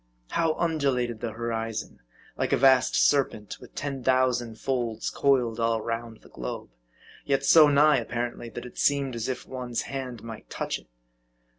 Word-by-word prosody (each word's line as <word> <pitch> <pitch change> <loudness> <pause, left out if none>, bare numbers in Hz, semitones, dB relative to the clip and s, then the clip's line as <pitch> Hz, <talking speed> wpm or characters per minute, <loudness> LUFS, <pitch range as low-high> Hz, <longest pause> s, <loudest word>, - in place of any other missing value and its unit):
How 165 -2 +1
undulated 135 -8 0
the 115 -1 -4
horizon; 115 -1 -4 0.4
like - - -1
a - - +4
vast 130 -1 +5
serpent 130 -7 +1
with - - -14
ten 140 -3 -4
thousand 125 -3 +1
folds 120 -4 -2
coiled 125 -5 +2
all 115 0 +1
round 115 0 -5
the - - -18
globe; 60 0 -6 0.5
yet 135 -1 0
so 155 +1 +8
nigh, 145 -1 +5
ap 115 - -7
parently, 120 0 -4
that 120 - -6
it 125 - -10
seemed 140 -2 +2
as 115 +2 -3
if 130 -1 -4
one's 125 -2 -3
hand 130 -4 -6
might 115 -2 -9
touch - - -3
it. - - -22
125 Hz, 165 wpm, -27 LUFS, 115-135 Hz, 0.5 s, so